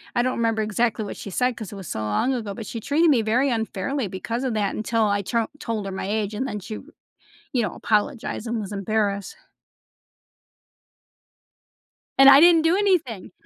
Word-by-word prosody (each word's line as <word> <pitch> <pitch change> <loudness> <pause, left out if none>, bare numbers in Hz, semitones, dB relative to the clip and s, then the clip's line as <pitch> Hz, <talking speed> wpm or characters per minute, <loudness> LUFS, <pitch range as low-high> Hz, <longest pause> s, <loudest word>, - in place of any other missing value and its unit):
I 240 - +3
don't 255 0 -1
remember 225 -1 +1
exactly 215 +1 0
what - - -7
she - - -7
said 250 +5 0
'cause 215 -4 -7
it - - -7
was 190 -4 -8
so - - -4
long 105 - 0
ago, 220 -5 -4
but 225 0 -7
she 230 - -6
treated 305 +8 +2
me 255 -6 +4
very 245 +6 +1
unfairly 225 +2 -2
because 225 +7 -4
of 250 - -1
that 205 -2 0
until 225 +1 0
I 205 -1 +1
t 235 +5 -2 0.2
told 225 -7 -3
her 195 - -4
my 190 0 -4
age, 210 0 -1
and 260 +6 -2
then 210 - -4
she, 215 +3 -7 0.8
you 245 - +2
know, 210 - -3
apologized 225 +1 -1
and 230 0 -2
was 205 -1 -6
embarrassed. 200 -1 -1 2.8
And 270 0 +9
I 275 0 +9
didn't 335 0 +7
do 325 +2 +3
anything. 345 - 0
225 Hz, 190 wpm, -23 LUFS, 205-255 Hz, 2.8 s, And